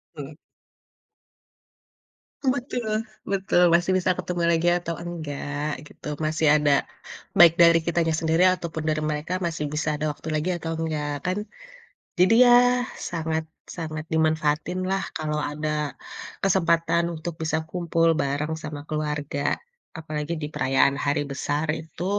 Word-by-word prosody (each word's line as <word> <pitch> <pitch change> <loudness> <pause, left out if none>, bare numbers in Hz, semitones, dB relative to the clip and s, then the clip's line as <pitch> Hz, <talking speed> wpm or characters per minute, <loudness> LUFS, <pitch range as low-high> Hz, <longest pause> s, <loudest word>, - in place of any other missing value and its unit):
Mmm. 145 +1 -8 2.1
Betul 255 -2 -1 0.5
betul, 190 -2 +2
masih 175 +2 +3
bisa 185 0 +2
ketemu 175 -1 -2
lagi 165 +1 +1
atau 170 -1 -4
enggak, 150 -4 -4
gitu. - - -12 0.2
Masih 155 0 +1
ada, 150 -1 +3 0.7
baik 170 -2 +9
dari 170 0 +7
kitanya 170 -1 +1
sendiri 165 +2 +2
ataupun 165 -3 -5
dari 155 0 0
mereka, 155 +3 -2
masih 160 -3 -2
bisa 150 +1 -2
ada 150 - -2
waktu 150 - -12
lagi 155 +4 -1
atau 165 -1 -5
enggak 155 -2 -2
kan. 185 +2 0 0.8
Jadi 185 +5 +5
ya 245 0 +5 0.3
sangat 160 -1 -2 0.3
sangat 155 -2 -5
dimanfaatinlah 160 +4 0
kalau 150 -1 -2
ada 150 +1 -3 0.8
kesempatan 170 -3 +2
untuk 165 +1 -5
bisa 160 0 0
kumpul 165 -1 +1
bareng 145 +3 -1
sama 150 -1 -6
keluarga. 150 -2 -1 0.4
Apalagi 155 0 -4
di - - -1
perayaan 135 +1 +2
hari 145 +1 +1
besar 145 +3 -1
itu 160 +2 -6
160 Hz, 125 wpm, -25 LUFS, 150-175 Hz, 2.1 s, baik